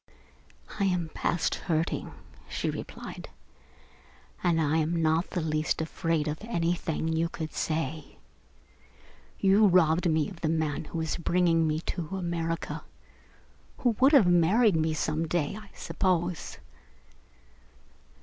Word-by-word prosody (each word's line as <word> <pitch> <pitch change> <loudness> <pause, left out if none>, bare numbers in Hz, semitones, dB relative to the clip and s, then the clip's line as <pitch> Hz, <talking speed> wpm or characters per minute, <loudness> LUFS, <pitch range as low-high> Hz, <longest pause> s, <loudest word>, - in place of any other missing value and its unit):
"I 200 - +2
am 180 -4 0
past 170 +1 0
hurting," 165 -1 -2 0.4
she - - -2
replied, - - -8 1.1
"and 170 -2 +3
I 155 0 +2
am 160 +2 0
not 160 +2 +2
in - - -13
the - - -2
least 155 0 0
afraid 160 -1 -1
of 150 +1 -3
anything 170 -6 -1
you 165 +1 0
could 160 -2 -6
say. 155 -1 -3 1.2
You 200 +2 +5
robbed 175 -1 +4
me 155 -2 +2
of 185 -4 -10
the 155 - 0
man 160 -2 -1
who 165 - -6
was 160 -1 -2
bringing 170 -1 +2
me 155 +1 -1
to 175 +2 -4
America 170 -2 -3 0.9
who 245 - +2
would 270 +4 +5
have 265 -9 +7
married 180 +5 +4
me 160 0 +1
some 155 +1 -1
day, 160 0 -1
I 215 -1 -10
suppose. 180 -3 -1
165 Hz, 130 wpm, -28 LUFS, 160-180 Hz, 1.2 s, have